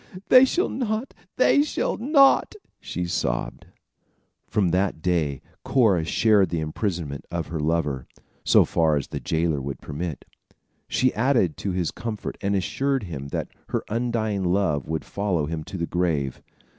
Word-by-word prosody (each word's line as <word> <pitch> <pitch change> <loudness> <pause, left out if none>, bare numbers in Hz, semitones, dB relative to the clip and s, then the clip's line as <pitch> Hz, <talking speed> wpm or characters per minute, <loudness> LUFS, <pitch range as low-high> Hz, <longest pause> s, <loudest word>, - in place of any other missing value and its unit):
they 255 0 +9
shall 355 +8 +1
not! 235 0 -2 0.2
they 270 +2 +5
shall 300 - -1
not!" 275 - +4 0.2
she 90 - -4
sobbed. 65 -7 -2 0.8
From 105 -4 +1
that 95 0 0
day, 80 -6 0 0.2
Cora 105 -11 +3
shared 105 0 +3
the 85 0 -1
imprisonment 80 -2 -3
of 85 -2 -4
her 80 -1 -3
lover, 75 -4 -1 0.4
so - - +5
far 80 -2 +2
as 70 - -3
the - - -4
jailer 80 -3 0
would 70 0 -5
permit. 75 -1 -5 0.6
She 130 0 +1
added 115 - +2
to 100 - -3
his 90 -3 -1
comfort 110 -3 -5
and 100 0 0
assured 135 +7 0
him 70 -7 -6
that - - -4 0.2
her - - -1
undying 110 -3 -1
love 90 -6 +1
would 80 0 -3
follow 95 -7 -1
him 80 0 -4
to 95 - -6
the 85 - -1
grave. 80 -7 -1
90 Hz, 155 wpm, -24 LUFS, 80-110 Hz, 0.8 s, they